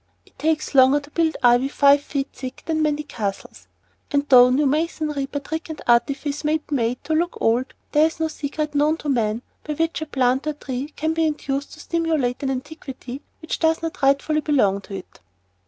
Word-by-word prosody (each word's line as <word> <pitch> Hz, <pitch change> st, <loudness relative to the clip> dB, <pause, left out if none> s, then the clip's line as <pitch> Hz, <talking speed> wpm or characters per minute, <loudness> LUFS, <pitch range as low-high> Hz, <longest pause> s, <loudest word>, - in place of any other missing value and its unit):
It -, -, -27 dB
takes 310 Hz, -1 st, 0 dB
longer 265 Hz, +1 st, +6 dB
to 290 Hz, +1 st, -15 dB
build 325 Hz, 0 st, +1 dB
ivy 245 Hz, +2 st, +5 dB
five 280 Hz, 0 st, +4 dB
feet 280 Hz, -1 st, -3 dB
thick 255 Hz, 0 st, -8 dB
than 315 Hz, -1 st, 0 dB
many 300 Hz, -1 st, 0 dB
castles, 205 Hz, -9 st, -5 dB, 0.4 s
and 285 Hz, 0 st, 0 dB
though 250 Hz, -2 st, +8 dB
new 275 Hz, +4 st, +2 dB
masonry 300 Hz, -1 st, -1 dB
by 285 Hz, -, -5 dB
trick 320 Hz, +4 st, -5 dB
and 315 Hz, -, -6 dB
artifice 280 Hz, +5 st, +1 dB
may 305 Hz, +1 st, +2 dB
be 300 Hz, -1 st, -9 dB
made 245 Hz, -2 st, 0 dB
to 305 Hz, +2 st, -2 dB
look 340 Hz, +2 st, +1 dB
like -, -, -12 dB
old, 240 Hz, +4 st, +1 dB, 0.2 s
there 300 Hz, +1 st, +5 dB
is 325 Hz, -, -8 dB
no 320 Hz, -, +1 dB
secret 300 Hz, 0 st, -4 dB
known 300 Hz, +2 st, +2 dB
to 300 Hz, -, -5 dB
man 230 Hz, -3 st, 0 dB, 0.2 s
by 300 Hz, -, -4 dB
which 325 Hz, +1 st, -1 dB
a 315 Hz, -, -4 dB
plant 260 Hz, 0 st, +1 dB
or 305 Hz, -, 0 dB
tree 270 Hz, -2 st, -5 dB
can 315 Hz, +1 st, -1 dB
be 325 Hz, 0 st, +2 dB
induced 285 Hz, -2 st, -3 dB
to -, -, -13 dB
simulate 315 Hz, -7 st, -1 dB
an 275 Hz, -, -1 dB
antiquity 265 Hz, -1 st, -6 dB, 0.2 s
which 315 Hz, -, -3 dB
does 325 Hz, 0 st, +2 dB
not 325 Hz, -2 st, -4 dB
rightfully 280 Hz, +3 st, +2 dB
belong 205 Hz, -11 st, +2 dB
to 195 Hz, -, -8 dB
it. 190 Hz, -, -10 dB
290 Hz, 205 wpm, -22 LUFS, 260-310 Hz, 0.4 s, though